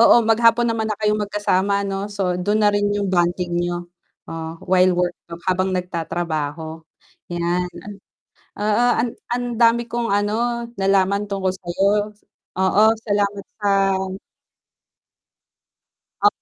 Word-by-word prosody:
Oo, 230 - +8
maghapon 230 +1 +4
naman 225 -1 -1
na - - -5
kayong 210 0 +1
magkasama 200 -1 +1
ano, 195 0 -3
so 190 -3 -1
dun 205 +4 0
na 210 - +5
rin 205 0 +1
yung 205 -1 -1
bonding 175 -1 0
niyo. 175 0 -2 0.4
Oh, 165 0 -6
while 185 0 +5
work 175 0 0 0.3
habang 185 +1 +1
nagtatrabaho, 165 -3 -3 0.5
yan, 175 +1 0 0.9
oo 210 +3 +1 0.5
ang 245 0 -1
dami 235 0 +4
kong 235 -2 -1
ano 225 +4 0
nalaman 195 0 +1
tungkol 190 -2 -1
sayo. 195 +3 0 0.5
Oo 190 +2 +2 0.3
salamat 205 -1 0 0.2
sa 205 - 0 2.6
O - - +9
195 Hz, 115 wpm, -21 LUFS, 180-210 Hz, 2.6 s, O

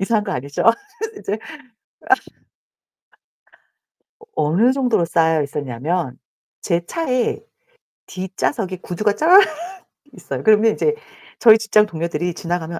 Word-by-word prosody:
이상한 210 +2 0
거 195 - -3
아니죠? 140 -2 -4
아 230 - +7 0.5
이제 205 - -3
아. 260 +9 -10 2.6
어 450 - -17
어느 180 +12 +3
정도로 250 -9 +1
쌓여 160 -1 +2
있었냐면 140 +1 -3 0.4
제 170 -2 -1
차에 255 - -1 0.7
뒷좌석에 190 +2 -3
구두가 200 +4 -1
쫙 355 - +7 0.7
있어요. - - -6
그러면 220 0 +4
이제 450 0 0 0.4
저희 220 -2 +8
직장 220 -1 +3
동료들이 170 -1 -3
지나가면 170 0 -4
190 Hz, 255 characters per minute, -20 LUFS, 165-225 Hz, 2.6 s, 저희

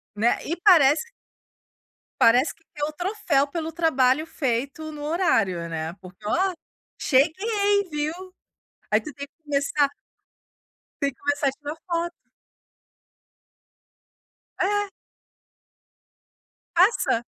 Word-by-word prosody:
Né, 230 +3 +2
e 335 - -1
parece 320 -4 +6 1.2
parece 250 +6 +5
que 325 - -31
quer 295 - -4
o 310 - -6
troféu 350 -5 0
pelo 320 +2 -4
trabalho 305 -3 +2
feito 280 +1 -2
no 295 -1 -8
horário, 225 - +1
né, 160 0 -4
porque: 185 +3 -14
"Ó, 370 - +1 0.4
cheguei, 400 - +2
viu?". 300 0 -2 0.8
Aí 215 +1 +4
tu 300 - -8
tem 280 +2 -7
que 320 +3 -53
começar 285 0 +1 1.1
tem 280 -1 +1
que 250 - -28
começar 285 0 0
a 270 - +2
tirar 290 +2 -7
foto. 345 0 -3 2.4
É. 410 +1 +1 1.9
Faça, 345 - +3
295 Hz, 105 wpm, -24 LUFS, 265-340 Hz, 2.4 s, parece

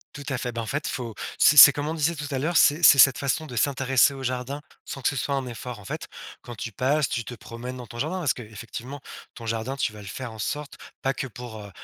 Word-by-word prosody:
Tout 145 - -7
à 130 - -1
fait, 125 -1 -4
ben, 115 - -3
en - - -5
fait, 145 +6 -3
faut 120 -4 -4 0.2
c'est 150 - +5
c'est, 140 0 +12
comme 145 +1 -3
on - - -2
disait 165 +1 0
tout 145 -1 -5
à 130 - -1
l'heure, 160 +6 -1
c'est 150 +1 +5
c'est 140 -2 +8
cette 135 -1 +7
façon 140 +3 -1
de 125 - -8
s'intéresser 135 +1 +3
au 135 -1 -8
jardin, 130 +3 -3 0.2
sans 135 - -7
que - - +2
ce 140 - -4
soit 140 +4 -1
un 135 - -2
effort. 120 -1 -7
En 105 - -13
fait, - - -5 0.3
quand 120 - -9
tu 115 +1 -6
passes, 135 +7 +1
tu 120 - -3
te 125 - -7
promènes 115 +4 -8
dans 125 -1 -8
ton 120 +1 -10
jardin, 170 +7 -2
parce 150 -8 +1
qu'effectivement, 120 +4 -8 0.3
ton 115 - -10
jardin, 115 +4 -2
tu 135 - -1
vas 105 - -12
le 100 - -11
faire 125 +4 -6
en 110 - -11
sorte, 150 +5 -4 0.2
pas 135 - 0
que 135 - -4
pour, 120 -2 -9
heu, 100 - -10
130 Hz, 275 wpm, -25 LUFS, 115-140 Hz, 0.3 s, c'est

